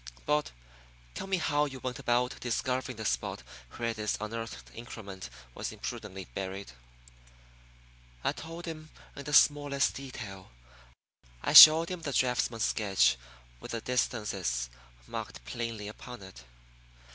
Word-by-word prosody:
But, 150 0 +1 0.6
tell - - -6
me 190 -1 +1
how 150 -3 +1
you 135 -2 -7
went 125 0 -4
about 125 +1 0
discovering 125 0 -2
the 110 - -5
spot - - -2 0.3
where 115 -1 -2
this 110 -1 -2
unearthed 115 +2 -6
increment 100 - -8 0.2
was - - -4
imprudently 95 -2 -6
buried." 95 -3 -5 1.5
I - - +2
told 165 +2 -8
him 155 -2 -7 0.3
in 140 - -8
the 150 - -4
smallest 145 -1 +4
detail. 115 -8 -8 0.9
I - - 0
showed 160 +2 +12
him 180 -2 -5
the 145 -3 -4
draughtsman's 120 -3 +1
sketch 100 - +3 0.4
with - - -8
the 115 - -3
distances 95 - -1 0.3
marked - - -7
plainly 115 - -4
upon 120 +1 -9
it. 80 -10 -13
120 Hz, 130 wpm, -30 LUFS, 105-140 Hz, 1.5 s, showed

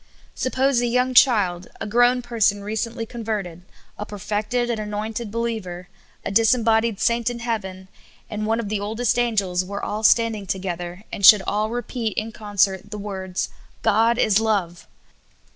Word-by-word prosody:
Suppose 260 -1 +1
a 240 - 0
j 235 - -2
oung 255 +1 +1
child, 200 -9 +4
a - - -4
grown 245 +3 +3
person 220 -4 +1
recentl}^ 225 +2 -3
converted, 210 -8 -4 0.4
a - - -2
perfected 210 +4 -2
and 225 - -2
anointed 215 +2 -4
be 225 - -6
liever, 185 -7 -4 0.4
a - - -2
disembodied 225 0 +3
saint 235 0 +1
in 240 - -5
heaven, 195 -6 -4 0.4
and 215 0 -4
one 225 +1 +1
of 230 - -3
the 210 0 -2
oldest 225 +4 0
angels, 200 -7 +1
were 200 +2 -6
all 210 +1 -3
standing 220 -2 +3
together, 180 0 -4
and 200 - -6
should 200 0 +9
all 215 +1 -1
repeat 235 -1 -3
in 220 +1 -2
concert 205 -2 0
the 210 - -6
words, 190 -2 -4 0.2
" - - -34
God 230 +3 +3
is 215 -4 +3
love 200 -6 -1
215 Hz, 165 wpm, -22 LUFS, 200-235 Hz, 0.4 s, should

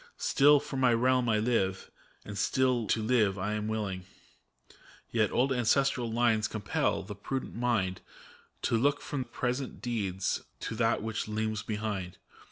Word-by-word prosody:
Still 145 +1 +5
for 140 -1 -6
my 125 -3 +4
realm 125 0 +2
I 110 - +3
live, 105 -4 0 0.3
and 105 - -7
still 125 +2 +1
to 110 +2 +1
live 110 -4 +2
am 105 +2 -2
willing; 100 -4 -3 1.0
Yet 110 -2 +2
old 135 +2 +2
ancestral 125 0 +2
lines 115 -2 +2
compel 105 -2 -1
the 105 +2 -7
prudent 130 +6 -4
mind 110 -6 0 0.6
To - - +2
look 140 +5 +2
from 135 -3 -4
present 125 +2 -3
deeds 100 -6 -1 0.2
to - - -3
that 115 -1 +1
which 110 -1 -3
looms 110 0 -2
behind. 105 -5 -4
115 Hz, 145 wpm, -30 LUFS, 105-125 Hz, 1.0 s, Still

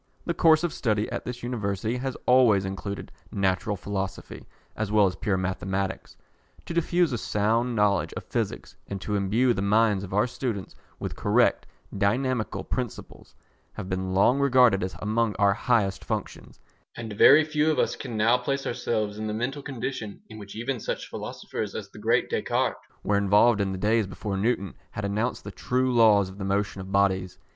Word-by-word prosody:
The 170 - 0
course 160 -1 +4
of 175 - -1
study 105 -3 0
at - - -4
this 125 0 -6
University 110 -1 -2
has 130 0 -4
always 120 -6 +5
included 100 +1 -5 0.2
Natural 95 +1 0
Philosophy, 95 -1 -5 0.3
as 105 -1 -3
well 105 -1 +5
as 90 -2 0
Pure 100 -4 -1
Mathematics. 95 +1 -3 0.5
To - - -5
diffuse 170 -2 +1
a 120 - -2
sound 115 +5 0
knowledge 105 -3 +2
of - - -6
Physics, - - -4
and 100 - -5
to 105 - -4
imbue 110 +6 +2
the 95 - -3
minds 105 0 +3
of 95 - -8
our 105 +3 +3
students 120 -5 -4 0.2
with - - -5
correct - - +2 0.3
dynamical 110 +4 0
principles, 125 -3 -6 0.4
have 95 - -7
been 95 0 -2
long 125 +8 +4
regarded 125 -7 +4
as 95 0 -3
among 110 0 0
our 100 -1 +3
highest 100 -3 0
functions, - - -5 0.4
and 115 -3 -6
very 145 +9 +7
few 150 0 +1
of 155 - +1
us - - +1
can 120 -5 -6
now 115 +4 +4
place 135 +2 -2
ourselves 110 -3 -2
in 110 - -3
the 105 - -3
mental 135 +6 -3
condition 130 -5 -5
in 110 -1 -10
which 100 0 -10
even 120 +3 -3
such - - -4
philosophers - - -5
as - - -6
the - - -12
great - - +2
Descartes - - -1 0.2
were 100 - +2
involved 105 +2 +4
in 95 -1 0
the 95 - -4
days 110 +2 +1
before 100 +1 -5
Newton 100 -2 0 0.2
had 105 - -5
announced 105 +5 -2
the 100 - -7
true 125 +6 0
laws 110 -4 +5
of 95 +2 -11
the - - -4
motion 100 0 -1
of 95 0 -9
bodies. 95 -2 +1
105 Hz, 185 wpm, -26 LUFS, 100-125 Hz, 0.5 s, very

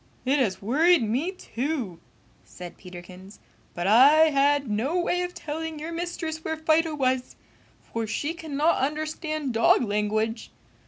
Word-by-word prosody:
"It 275 +3 +2
has 205 -7 -1
worried 310 - +4
me, 255 - -1
too!" 260 - -4 0.4
said 180 -1 -11
Peterkins, 180 +2 -12 0.4
"but 175 - -3
I 285 +9 +6
had 285 0 +2
no 240 +12 -1
way 355 0 0
of 360 0 -4
telling 320 +1 -5
your 315 +3 -6
mistress 330 -2 -4
where 320 0 -3
Fido 315 0 +1
was, 260 -2 -1 0.6
for 230 -1 -2
she 290 +8 -2
cannot 315 -1 0
understand 310 0 -3
dog 225 +2 +4
language! 215 +1 -1
285 Hz, 140 wpm, -25 LUFS, 225-320 Hz, 0.6 s, I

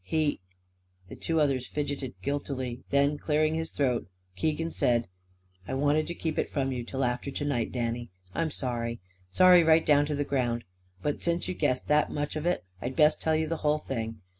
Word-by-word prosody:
He 150 +8 0 0.3
" 90 0 -33
The - - -8
two 165 -1 -1
others 135 -4 +1
fidgeted 145 -3 -3
guiltily. 130 -3 -3
Then, 140 +1 +2
clearing 155 0 +2
his 160 0 -2
throat, 125 -4 0 0.3
Keegan 160 - -1
said: 120 -2 +1 0.6
"I 130 - -2
wanted 145 +3 +2
to 170 - -4
keep 160 -2 -2
it - - 0
from 135 -2 -1
you, 125 -2 -3
till 130 +3 -3
after 125 +2 -1
to 145 +1 -3
night, 125 -6 0
Danny. 120 -1 -2 0.2
I'm 165 -1 0
sorry. 120 -4 -3 0.3
Sorry, 180 - +7
right 160 0 +5
down 145 0 +4
to 150 - -1
the 145 - 0
ground. 120 -4 -1 0.4
But 145 - -1
since 170 0 0
you've 185 - -4
guessed 130 -4 +1
that 150 0 +4
much 145 0 -3
of 155 +2 -2
it 175 - 0 0.2
I'd 125 +2 -3
best 155 0 +4
tell 160 -1 +2
you 160 0 +1
the 165 +1 -2
whole 150 0 +2
thing. 115 -7 -4
145 Hz, 200 wpm, -28 LUFS, 125-155 Hz, 0.6 s, Sorry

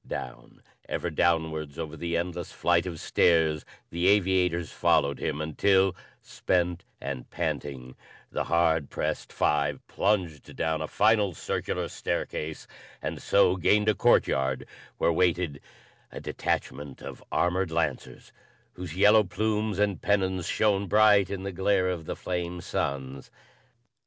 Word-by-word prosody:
Down, - - -7 0.3
ever 85 - -2
downwards 80 -3 0
over 80 -1 -5
the 85 +2 -2
endless 85 0 -4
flight 85 +1 +1
of 85 -3 -6
stairs 80 -3 +2 0.3
the 85 +2 0
aviators 90 -4 +2
followed 70 0 +2
him 75 - -2
until, 95 +5 +2 0.3
spent 90 -1 -1 0.2
and 65 -3 -6
panting, 70 -6 -4 0.4
the - - -2
hard 80 -3 +2
pressed - - -3
five 75 -2 +1
plunged 90 -8 -1
down 80 0 -1
a 80 - -3
final 105 -2 +2
circular - - -3
staircase 75 0 -4 0.3
and - - -5
so 95 -2 +4
gained 105 +4 +3
a - - +4
courtyard 65 -7 +2 0.3
where 85 - +2
waited 85 -4 +1 0.5
a - - -7
detachment 70 -1 -3
of - - -9
armored 90 +1 +1
lancers 80 0 -3 0.4
whose 90 -3 -7
yellow 105 +3 +6
plumes 105 +2 -1
and 100 -2 0
pennons 95 -3 0
shone 100 -2 +1
bright 105 -1 +5
in 95 -1 -4
the 100 - -3
glare 95 0 +1
of 85 -3 -4
the - - -4
flame 90 -1 -4
suns. 70 -4 -4
85 Hz, 130 wpm, -27 LUFS, 80-95 Hz, 0.5 s, yellow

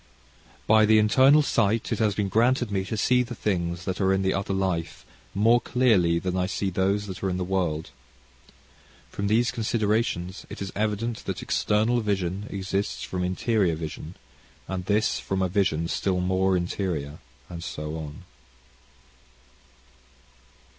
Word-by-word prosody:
"By 110 0 +5
the 110 0 +6
internal 130 +8 +5
sight 115 -4 +1
it - - -1
has 105 -3 +1
been 105 -1 0
granted 120 +3 +2
me 95 -1 0
to 110 - -4
see 125 +4 +3
the 120 0 -5
things 85 -4 -2
that 95 +1 -3
are 95 0 +3
in 95 0 +1
the 95 - +1
other 100 0 -2
life, 95 -7 -2 0.3
more 115 +4 +4
clearly 110 -10 +3
than 90 +1 -2
I 90 0 0
see 95 0 -2
those 100 +3 0
that 95 -3 -7
are 95 - 0
in 90 - -1
the 90 - -1
world. 90 -4 -2 1.2
From 100 - -3
these 115 +3 +2
considerations, 110 -5 -1
it - - -8
is 100 -1 -4
evident 110 +2 -1
that - - -4
external 110 +3 +1
vision 100 -1 -2
exists 100 +1 -3
from 90 -1 -3
interior 95 -1 +1
vision, 80 +2 -7 0.5
and 95 -1 -4
this 105 +2 +1
from 95 -1 -2
a - - +2
vision 85 -4 0
still 95 +1 -1
more 95 +1 +2
interior, 85 -5 -3 0.3
and 85 -1 -8
so 75 -2 -5
on."... 80 +3 -7
95 Hz, 155 wpm, -26 LUFS, 90-110 Hz, 1.2 s, the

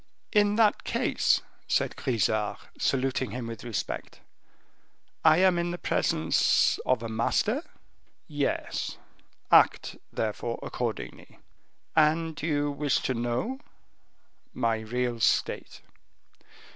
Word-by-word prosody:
"In 205 -1 +3
that 215 -2 +3
case," - - +1 0.3
said - - +1
Grisart, 110 -3 0 0.2
saluting 130 -1 0
him 125 -1 -5
with 115 -2 -7
respect, 115 -6 -4 1.0
"I 155 -1 +6
am 185 -1 +4
in 170 0 -1
the 175 - -3
presence 80 - +2
of 125 -3 +2
a - - -3
master?" 160 - 0 0.7
"Yes; 145 -4 -2 0.5
act, - - +4
therefore, 115 +2 -2
accordingly." 115 -4 -5 0.6
"And 160 0 +2
you 145 -2 0
wish 145 -1 0
to 130 - 0
know?" 120 - -2 1.0
"My 115 -3 +1
real 120 +2 -2
state." - - 0
130 Hz, 105 wpm, -28 LUFS, 115-160 Hz, 1.0 s, I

